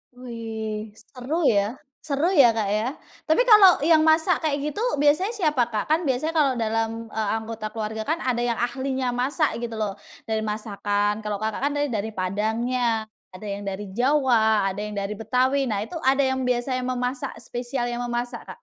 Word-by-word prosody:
Wih 220 -3 -6
,seru 280 +10 -4
ya 205 +3 +1 0.3
seru 300 +6 +1
ya, 250 -10 +6
Kak, 210 -3 0
ya 225 +7 -1 0.3
tapi 315 +11 +4
kalau 400 - +7
yang 320 0 +5
masak 320 +2 +3
kayak 295 -1 -1
gitu 360 - -7 0.2
biasanya 300 +10 +2
siapa, 300 - +1
Kak? 220 +6 -3
Kan 320 -1 +2
biasanya 270 +5 0
kalau 295 -5 +3
dalam, 225 0 -2
eee, 220 -2 -2
anggota 220 -1 -5
keluarga 220 +1 -5
kan 325 +2 -1
ada 245 -2 0
yang 240 -1 0
ahlinya 260 +1 -1
masak 265 +2 0
gitu 235 -1 -5
loh 215 -2 -1 0.3
dari 220 -1 -1
masakan 210 -1 -1
kalau, 210 -1 -3
Kakak, 215 +1 -3
kan - - -1
tadi 290 -2 0
dari 220 0 -3
padangnya 220 +5 0 0.2
ada 185 +3 -13
yang 200 -1 -5
dari 195 0 -5
Jawa 230 -5 +3
ada 195 - -7
yang 210 0 -5
dari 200 +1 -4
Betawi 255 +4 +1
nah 210 -2 -1
itu 330 +8 -6
ada 275 0 +3
yang 260 -1 0
biasanya 250 +1 0
memasak 255 +2 -3
spesial 245 +1 -4
yang 240 - -3
memasak, 240 0 -3
Kak? - - -8
240 Hz, 180 wpm, -24 LUFS, 215-275 Hz, 0.3 s, kalau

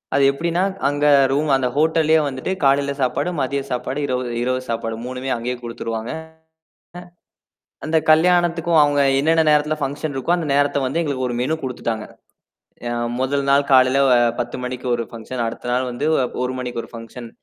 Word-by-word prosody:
அது 140 - +3
எப்பிடின்னா, 170 +5 -1 0.3
அங்க 145 +1 -1 0.3
ரூம் 150 +2 0
அந்த 130 -1 +1
ஹோட்டல்லயே 160 0 +3
வந்துட்டு 130 +6 -4
காலையில 140 +1 +3
சாப்பாடு, 140 +5 0
மதிய 140 +1 -1
சாப்பாடு, 130 +3 -3
இரவு, 130 -2 -1 0.2
இரவு 130 +1 0
சாப்பாடு 115 -1 -2
3மே 130 +1 -5
அங்கேயே 125 +2 -3
குடுத்துடுவாங்க. 115 -1 -5 1.7
அந்தக் 160 0 0
கல்யாணத்துக்கும் 170 0 +3
அவுங்க 145 -1 +2 0.2
என்னென்னா 160 +2 +3
நேரத்துல 150 +1 +2
ஃபங்சன் 145 +2 -3
இருக்கோ 135 +6 0
அந்த 165 -3 -3
நேரத்த 145 0 +2
வந்து 150 +6 -1
எங்களுக்கு 135 -5 -2
ஒரு 120 - -3
மெனு 155 +5 0
குடுத்துட்டாங்க. 115 -4 -3 0.8
யா 120 - -2 0.3
முதல் 140 +1 0
நாள் 140 +1 +3
காலையில 130 +1 +5 0.4
10:00 120 0 -3
மணிக்கு 125 0 -5
ஒரு 120 - -1
ஃபங்சன் 120 +2 -5
அடுத்தநாள் 125 +2 -2
வந்து 120 +5 -3 0.4
1:00 125 - -2
மணிக்கு 125 -2 -4
ஒரு - - -16
ஃபங்சன். 115 +1 -9
135 Hz, 155 wpm, -20 LUFS, 125-150 Hz, 1.7 s, காலையில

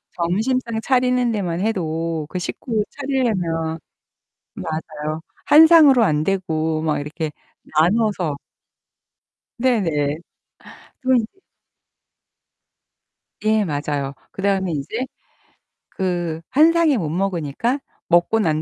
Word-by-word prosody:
점심상 220 +7 -1
차리는 250 -2 +2
데만 180 -5 -2
해도 165 -6 -2
그 185 - -4
식구 215 +4 -2
차리려면 185 - -1 0.8
맞아요. 155 -1 -5 0.3
한 315 +2 +8
상으로 295 -8 +7
안되고 160 -2 0
막 155 -2 0
이렇게 150 +2 -4 0.3
나눠서. 180 -1 +1 1.2
네네. 165 - +1 0.8
그런데 255 -3 +3 2.2
예 215 -1 +2
맞아요. 145 -3 -2 0.2
그다음에 195 -2 0
인제 165 - -3 0.8
그 175 -3 -2
한 310 +5 +5
상에 330 -5 +3
못 160 -8 -2
먹으니까 185 - -1 0.3
먹고 175 +6 +3
난 155 -5 +1
180 Hz, 195 characters per minute, -21 LUFS, 160-235 Hz, 2.2 s, 한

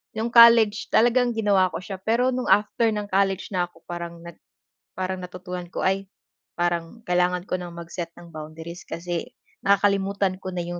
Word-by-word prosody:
'yong 225 +2 -2
college 230 -2 +7
talagang 240 +2 +4
ginawa 200 -4 +3
ko - - -3
siya 190 0 -7
pero 240 +5 +2
no'ng 250 0 -2
after 215 +2 +3
ng 210 -1 -3
college 195 0 +1
na 175 -1 +1
'ko 165 - -23
parang 170 -1 -6 0.8
parang 185 0 -2
nag 180 0 -8
natutunan 180 -1 -7
ko, - - -4
"Ay 195 +1 0 0.5
parang 175 +5 -2
kailangan 180 0 +1
ko - - -1
ng 175 -1 -7
mag-set 170 0 -6
ng 170 -1 -13
boundaries 160 +2 -8
kasi 170 0 -4 0.4
nakakalimutan 200 -1 +2
ko 185 - -5
na 175 - -2
'yong 175 0 -5
185 Hz, 170 wpm, -24 LUFS, 175-210 Hz, 0.8 s, college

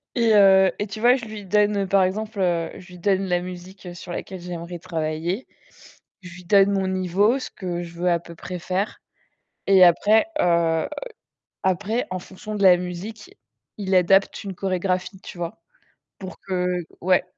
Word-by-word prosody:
Et 230 -2 +3
heu, 190 -2 +6
et 205 - -3
tu 200 +2 -7
vois, 245 +3 +5
je 245 - -5
lui 215 -2 -8
donne 205 0 +2
par 195 0 +4
exemple, 210 +2 -3
heu, 170 -3 +1
je 185 -2 -13
lui 180 -1 -13
donne 195 +1 +1
la 180 -1 +1
musique, 180 +2 -9
heu, 175 - -7
sur 175 0 -9
laquelle 185 +1 -6
j'aimerais 175 0 -6
travailler. 165 +5 -3 0.7
Je 180 -1 -11
lui 180 - -12
donne 195 +2 +5
mon 195 -1 0
niveau, 190 +6 +1
ce 265 - -6
que 175 -3 -5
je 170 -1 -9
veux 175 +1 0
à 170 - +2
peu 170 0 -12
près 180 +2 -7
faire 185 +4 -3 0.7
et 190 -2 +7
après, 205 - +5
heu, 170 -2 +2 0.7
après, 205 +6 0
en 185 - -3
fonction 195 +4 -8
de 200 - -2
la 185 -2 +8
musique, 180 +5 -7 0.4
il 195 -2 -3
adapte 195 +3 +3
une 195 -2 -6
chorégraphie, 185 0 -2
tu - - -10
vois? 175 +5 -6 0.6
Pour 190 -1 -8
que 180 -2 -2 0.3
ouais. 185 +1 +3
185 Hz, 180 wpm, -23 LUFS, 175-200 Hz, 0.7 s, la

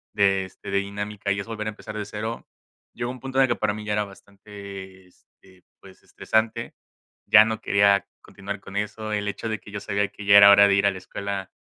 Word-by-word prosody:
de, 95 -2 +2
este, 95 +1 -10
de 100 - +2
dinámica 100 0 -4
y 100 - 0
es 100 - -5
volver 110 -1 -5
a - - 0
empezar 105 0 -9
de 105 - -3
cero. 110 +2 -6 0.5
Llegó 120 +1 -4
un 130 - -10
punto 135 0 -6
en 135 - +6
el - - +3
que - - 0
para 110 -1 -1
mí 105 0 -8
ya 105 - -1
era 105 0 0
bastante, 100 -1 -12
este, 90 0 -25 0.2
pues, 95 -1 -17
estresante. 110 +1 -2 0.5
Ya 110 0 +8
no 110 0 -3
quería 100 -1 +3 0.2
continuar 100 0 -7
con 100 - -12
eso. 105 +1 -3
El 105 0 -2
hecho 110 +2 -4
de 110 - -3
que - - -15
yo 100 - -5
sabía 100 +1 -1
que 105 - -11
ya 100 0 +7
era 100 0 +10
hora 100 0 +8
de 100 - +3
ir 100 0 +3
a - - +3
la 95 - -7
escuela 95 +1 -6
100 Hz, 235 wpm, -24 LUFS, 100-105 Hz, 0.5 s, era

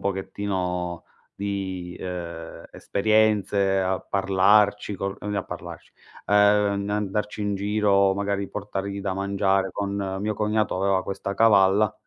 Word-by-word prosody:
pochettino 95 -3 -3 0.3
di, 95 -3 -4
uhm, 85 -2 -6
esperienze 100 -2 +2
a 95 0 0
parlarci 100 +2 +2
con 95 +1 -4
ehm, 105 0 -4
a 100 - 0
parlarci, - - -9 0.4
uhm, 100 - +1 0.5
n 100 - -4
andarci 105 0 -2
in 105 0 -1
giro, 100 -1 +2
magari 100 0 -2
portargli 100 -1 -4
da 95 -1 -2
mangiare 95 0 0
con 100 -1 -3
mio 105 +1 -1
cognato 105 -1 0
aveva 95 -1 +2
questa 100 +1 -4
cavalla, 100 -1 +4
100 Hz, 125 wpm, -24 LUFS, 95-105 Hz, 0.5 s, cavalla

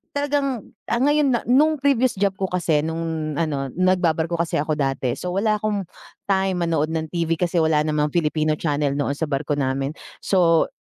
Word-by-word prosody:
talagang 285 -4 -1 0.2
ah 235 - 0
ngayon 290 +1 +3
na 240 - +2
nung 300 +6 +4
previous 260 -4 +2
job 195 0 0
ko 195 - -1
kasi, 175 -4 +1
nung 160 -1 -3
ano 140 -5 -2
nagba-barko 175 -2 +1
kasi 170 0 -1
ako 155 0 -1
dati, 135 -3 -1
so 180 0 -4
wala 210 +2 +1
'kong 210 -1 -1 0.5
time 190 -1 +2
manood 160 -2 0
ng 160 -1 -2
TV 165 -1 0
kasi 175 0 0
wala 160 -2 +3
namang 150 -1 0
Filipino 155 -2 +1
channel 145 -2 -1
noon 140 0 -1
sa 160 - -1
barko 145 +1 -2
namin. 135 +1 -1 0.3
So, 170 -4 +3
165 Hz, 175 wpm, -22 LUFS, 150-195 Hz, 0.5 s, nung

